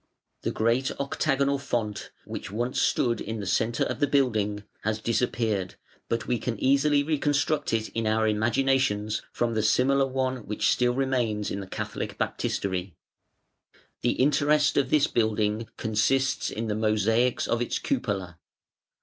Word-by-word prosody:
The - - -1
great 115 +4 +1
octagonal 140 0 0
font, 115 -7 -3 0.2
which - - -6
once 120 +5 -1
stood 120 -2 +1
in 110 +1 -4
the 100 - -4
centre 110 +5 +1
of - - -3
the 145 - +3
building, 110 -7 +1 0.2
has 110 +1 -1
disappeared, 110 -4 -1 0.3
but 115 -1 -1
we 120 -1 0
can 115 -4 -3
easily 140 +2 +3
reconstruct 150 0 0
it 110 -1 0
in 115 -1 -2
our 110 0 +2
imaginations 110 -1 +1
from 120 -1 -1
the 110 - +1
similar 135 +5 +3
one 130 0 -1
which 105 -3 0
still 125 0 +2
remains 125 -6 0
in 100 - -3
the 95 - -7
Catholic - - -5
Baptistery. 95 -2 -2 1.1
The 120 - +2
interest 145 +2 +3
of 135 -2 +2
this 150 0 +4
building 110 -1 0
consists 130 +5 +1
in 115 - -4
the 110 - -1
mosaics 110 +3 +1
of 115 - 0
its 120 - -1
cupola. 95 - -2
115 Hz, 150 wpm, -27 LUFS, 110-135 Hz, 1.1 s, this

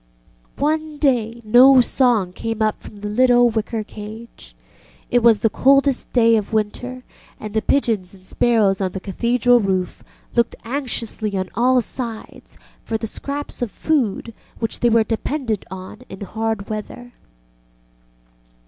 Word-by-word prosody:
One 310 +1 -1
day 235 -5 0
no 255 +4 +7
song 240 -7 +2
came 225 +3 -4
up 215 -1 -1
from 205 - -12
the 210 - -4
little 245 +2 +4
wicker 220 0 -2
cage. 215 +2 -11 0.6
It 245 - +3
was 230 -2 +5
the 225 - +1
coldest 275 0 +2
day 230 -2 +4
of 210 - -3
the - - -4
winter, 250 +4 -3 0.4
and 215 -1 -7
the 220 - +1
pigeons 220 -10 0
and 190 -1 -18
sparrows 205 -3 +2
on 185 -2 -1
the 190 - -4
Cathedral 240 +5 +2
roof 190 -4 -2 0.3
looked 235 -1 +1
anxiously 230 -5 -3
on 185 -1 -3
all 250 +1 +3
sides 230 -1 -7 0.3
for 225 - -2
the 225 - -5
scraps 280 +6 -5
of 240 - -1
food 235 -3 -1 0.2
which 225 - -3
they 240 - +3
were 230 -1 +4
dependent 225 0 -3
on 185 0 -9
in 190 - -10
hard 220 0 -3
weather. 245 +3 -7
230 Hz, 150 wpm, -20 LUFS, 210-250 Hz, 0.6 s, no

